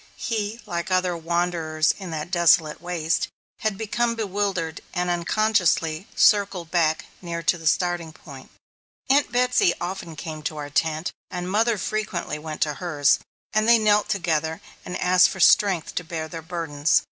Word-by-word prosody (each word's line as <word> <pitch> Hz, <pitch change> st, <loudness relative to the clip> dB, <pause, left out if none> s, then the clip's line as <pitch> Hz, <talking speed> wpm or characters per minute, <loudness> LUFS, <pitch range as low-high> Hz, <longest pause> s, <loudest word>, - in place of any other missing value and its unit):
He, 220 Hz, -1 st, -3 dB
like 170 Hz, +1 st, -4 dB
other 185 Hz, -1 st, +1 dB
wanderers 165 Hz, -2 st, 0 dB
on 190 Hz, -2 st, -7 dB
that 160 Hz, +1 st, -5 dB
desolate 170 Hz, -3 st, +3 dB
waste, 170 Hz, -2 st, -1 dB, 0.3 s
had 215 Hz, -3 st, -1 dB
become 230 Hz, +2 st, -1 dB
bewildered, 195 Hz, -6 st, -2 dB
and, 180 Hz, 0 st, 0 dB
unconsciously, 175 Hz, -2 st, +1 dB
circled 195 Hz, -5 st, +3 dB
back 160 Hz, -3 st, +1 dB, 0.2 s
near 170 Hz, -2 st, -5 dB
to 170 Hz, -, +3 dB
the 165 Hz, -2 st, -5 dB
starting 175 Hz, -1 st, 0 dB
point. 140 Hz, -4 st, -13 dB, 0.6 s
Aunt 285 Hz, +2 st, +3 dB
Betsy 250 Hz, -2 st, +3 dB
came 175 Hz, -, +2 dB
often 165 Hz, -3 st, -6 dB
to 155 Hz, -, -3 dB
our 145 Hz, -1 st, -6 dB
tent, 160 Hz, +2 st, 0 dB, 0.2 s
and 180 Hz, 0 st, -4 dB
mother 225 Hz, +2 st, +2 dB
frequently 190 Hz, -7 st, -3 dB
went 155 Hz, 0 st, -7 dB
to 150 Hz, -, +2 dB
hers, 145 Hz, -5 st, +2 dB, 0.3 s
and 215 Hz, +1 st, +2 dB
they 235 Hz, -, +8 dB
knelt 210 Hz, -1 st, +3 dB
together 160 Hz, -4 st, -1 dB, 0.2 s
and 180 Hz, 0 st, -5 dB
asked 180 Hz, 0 st, +5 dB
for 190 Hz, -, -7 dB
strength 185 Hz, -2 st, +4 dB
to 180 Hz, -, -2 dB
bear 160 Hz, -2 st, -5 dB
their 165 Hz, +1 st, -7 dB
burdens. 160 Hz, -3 st, +1 dB
175 Hz, 160 wpm, -24 LUFS, 160-200 Hz, 0.6 s, they